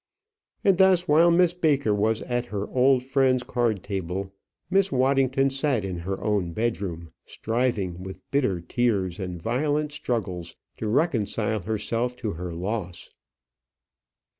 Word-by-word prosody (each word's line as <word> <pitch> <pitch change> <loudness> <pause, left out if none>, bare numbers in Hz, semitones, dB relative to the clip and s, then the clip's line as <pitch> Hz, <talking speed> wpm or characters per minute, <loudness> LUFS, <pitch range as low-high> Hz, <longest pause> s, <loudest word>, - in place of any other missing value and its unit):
And 195 -2 +3
thus, 185 -2 +5
while 165 +3 +5
Miss 175 0 +4
Baker 145 -10 +2
was 110 +2 +1
at 120 0 -2
her 105 -2 -3
old 130 0 +3
friend's 130 -1 +2
card 115 -7 -1
party, 95 -1 -4 0.4
Miss 195 +2 +2
Waddington 135 +1 +2
sat 135 -6 0
in 90 -2 -4
her 95 +3 -4
own 100 -5 0
bedroom, 95 -7 -3 0.2
striving, 110 -7 -1
with 95 0 -8
bitter 125 -11 +1
tears 100 -3 0
and 90 -2 -5
violent 145 - 0
struggles, 95 - -3 0.2
to 110 - -3
reconcile 110 - 0
herself 115 +4 -2
to 115 -4 -3
her 90 +1 -5
loss. 90 +1 -4
115 Hz, 135 wpm, -25 LUFS, 95-135 Hz, 0.4 s, thus